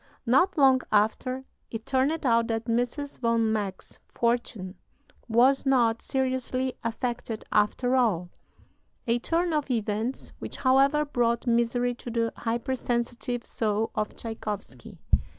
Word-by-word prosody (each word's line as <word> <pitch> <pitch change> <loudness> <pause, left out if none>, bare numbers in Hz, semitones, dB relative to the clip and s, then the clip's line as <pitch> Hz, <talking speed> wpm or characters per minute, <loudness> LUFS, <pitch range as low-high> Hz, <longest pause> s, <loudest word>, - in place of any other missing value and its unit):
Not 295 +11 +3
long 265 -2 +5
after, 240 +5 +1 0.2
it 225 -1 -6
turned 275 +4 +1
out 230 -2 +3
that 225 -1 -2
Mrs. 245 +5 -2
von 230 -2 +2
Meck's 200 -3 -4
fortune 235 -5 -1 0.6
was 250 +4 +4
not 240 -4 +3
seriously 260 -1 -1
affected, 230 -1 -3
after 245 +5 +2
all 185 -9 +1 0.7
a 235 0 +1
turn 335 +5 0
of 300 -2 0
events 225 +1 -2
which, - - -6
however, 275 +3 +4
brought 235 -4 0
misery 240 +1 +2
to 240 - -9
the 230 -1 0
hyper 235 +3 -2
sensitive 240 0 -2
soul 215 0 -1
of 210 0 -2
Tschaikowsky. 215 -3 -6
240 Hz, 125 wpm, -27 LUFS, 225-260 Hz, 0.7 s, long